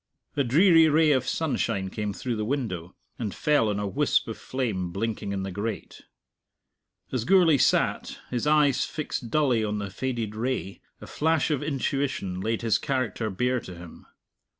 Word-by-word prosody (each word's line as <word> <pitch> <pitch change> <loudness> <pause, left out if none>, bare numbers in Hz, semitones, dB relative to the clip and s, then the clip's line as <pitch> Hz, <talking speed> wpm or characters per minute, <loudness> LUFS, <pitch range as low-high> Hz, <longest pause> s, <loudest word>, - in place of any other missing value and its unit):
A 140 - +2
dreary 165 +5 +5
ray 155 0 +4
of 130 -2 +1
sunshine 100 - -1
came 105 -1 -3
through 120 +4 -3
the 110 - -2
window, 105 -9 -3 0.2
and 110 -5 -3
fell 145 -8 +2
on 105 -1 -1
a 105 - -2
wisp 100 - +1
of - - -4
flame 105 -9 -3
blinking 100 +1 -3
in 95 -1 -2
the 95 - -4
grate. 105 +3 -5 1.1
As 125 -4 -1
Gourlay 170 -3 +5
sat, - - +1
his 125 +3 -1
eyes 150 -3 +4
fixed 140 -5 -4
dully 130 -5 +2
on 105 0 -1
the 100 -1 -4
faded 115 -2 -3
ray, 115 -4 -3 0.2
a - - -8
flash 160 0 +1
of 145 - 0
intuition 135 -9 -2
laid 110 +3 -2
his 115 -2 +2
character 125 -5 -2
bare 125 +6 0
to 90 -5 -10
him. 85 -1 -12
120 Hz, 170 wpm, -26 LUFS, 105-145 Hz, 1.1 s, dreary